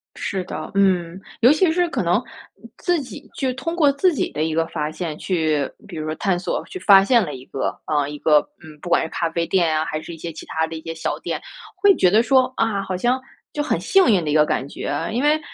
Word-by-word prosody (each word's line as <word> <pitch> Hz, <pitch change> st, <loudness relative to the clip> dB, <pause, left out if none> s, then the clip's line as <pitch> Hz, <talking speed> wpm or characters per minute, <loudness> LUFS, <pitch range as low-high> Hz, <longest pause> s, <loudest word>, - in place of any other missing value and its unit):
是 190 Hz, -3 st, -3 dB
的， -, -, -6 dB
嗯， 185 Hz, -3 st, +1 dB, 0.2 s
尤 245 Hz, +3 st, +7 dB
其 320 Hz, +1 st, +3 dB
是 350 Hz, +1 st, +1 dB
可 -, -, -1 dB
能 175 Hz, +7 st, +2 dB, 0.6 s
自 350 Hz, -2 st, 0 dB
己 265 Hz, -, -10 dB
就 260 Hz, -1 st, 0 dB
通 295 Hz, +7 st, -4 dB
过 300 Hz, -5 st, +4 dB
自 345 Hz, +6 st, +2 dB
己 280 Hz, -, -2 dB
的 155 Hz, -, -2 dB
一 160 Hz, 0 st, -1 dB
个 165 Hz, +1 st, +1 dB
发 150 Hz, -1 st, -3 dB
现 155 Hz, -2 st, -5 dB
去 155 Hz, -6 st, 0 dB, 0.2 s
比 175 Hz, -5 st, -8 dB
如 155 Hz, -, -4 dB
说 155 Hz, 0 st, -3 dB
探 185 Hz, +1 st, 0 dB
索 180 Hz, -, -3 dB
去 375 Hz, -, -8 dB
发 195 Hz, -, +7 dB
现 235 Hz, +2 st, +4 dB
了 150 Hz, -, -5 dB
一 130 Hz, +1 st, -11 dB
个， 135 Hz, -, -3 dB
呃， 145 Hz, -2 st, 0 dB
一 150 Hz, -, -6 dB
个， 150 Hz, 0 st, +5 dB, 0.2 s
嗯， 155 Hz, -1 st, -13 dB
不 175 Hz, -, -7 dB
管 170 Hz, -, +3 dB
是 160 Hz, -, -5 dB
咖 170 Hz, -, -2 dB
啡 170 Hz, +1 st, -1 dB
店 170 Hz, -4 st, +2 dB
啊， 155 Hz, -, 0 dB
还 155 Hz, -, -4 dB
是 170 Hz, -, -9 dB
一 -, -, -10 dB
些 165 Hz, +1 st, -6 dB
其 -, -, -9 dB
他 160 Hz, 0 st, 0 dB
的 165 Hz, -, -7 dB
一 160 Hz, -, -7 dB
些 165 Hz, 0 st, -6 dB
小 160 Hz, -, -3 dB
店， -, -, -4 dB, 0.4 s
会 400 Hz, -1 st, +5 dB
觉 180 Hz, -, +4 dB
得 220 Hz, +5 st, +4 dB
说， 255 Hz, 0 st, +3 dB
啊， 220 Hz, -3 st, +1 dB
好 185 Hz, -1 st, -3 dB
像 250 Hz, +6 st, +1 dB, 0.3 s
就 295 Hz, -, -1 dB
很 -, -, 0 dB
幸 385 Hz, -7 st, +4 dB
运 180 Hz, -5 st, +3 dB
的 150 Hz, -, -1 dB
一 -, -, 0 dB
个 150 Hz, -1 st, +5 dB
感 135 Hz, -, -1 dB
觉。 -, -, -5 dB, 0.2 s
因 245 Hz, -, 0 dB
为 300 Hz, +1 st, +3 dB
180 Hz, 280 characters per minute, -21 LUFS, 160-255 Hz, 0.6 s, 尤